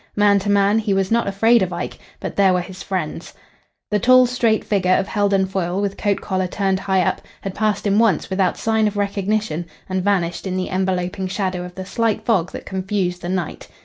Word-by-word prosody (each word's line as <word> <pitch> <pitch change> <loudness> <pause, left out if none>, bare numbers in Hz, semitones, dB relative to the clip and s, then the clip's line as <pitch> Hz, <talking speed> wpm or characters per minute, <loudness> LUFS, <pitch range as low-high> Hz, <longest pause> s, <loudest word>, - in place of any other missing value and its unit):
Man 205 -1 +4
to 200 +1 -3
man, 200 +1 +3
he 210 -3 0
was 195 +1 0
not 235 -1 +2
afraid 225 +4 +4
of 185 -1 0
Ike, 175 0 -5 0.2
but - - -5
there 195 -2 +4
were 180 - +1
his 185 +1 -9
friends. 180 -3 -4 0.6
The 210 - +2
tall 255 +3 +6
straight 235 -3 +1
figure 185 -3 +2
of 195 - 0
Heldon 200 -2 +1
Foyle, 190 -1 -2
with 200 -1 -1
coat 205 -2 -1
collar 185 -2 -1
turned 190 +1 0
high 190 -1 +1
up, - - -1 0.2
had 195 - -5
passed 215 0 0
him 200 +1 +3
once 225 -4 +2
without 190 -1 0
sign 220 -1 +1
of 205 0 -3
recognition 200 -3 -1 0.2
and 185 -1 -2
vanished 190 -2 0
in 185 0 -2
the 185 - -2
enveloping 185 0 -1
shadow 185 -1 -2
of 180 0 -9
the 190 - -6
slight 225 +2 -1
fog 190 -7 +1
that - - -8
confused 190 -2 -2
the 175 - -5
night. 180 -3 -3
195 Hz, 210 wpm, -20 LUFS, 185-205 Hz, 0.6 s, tall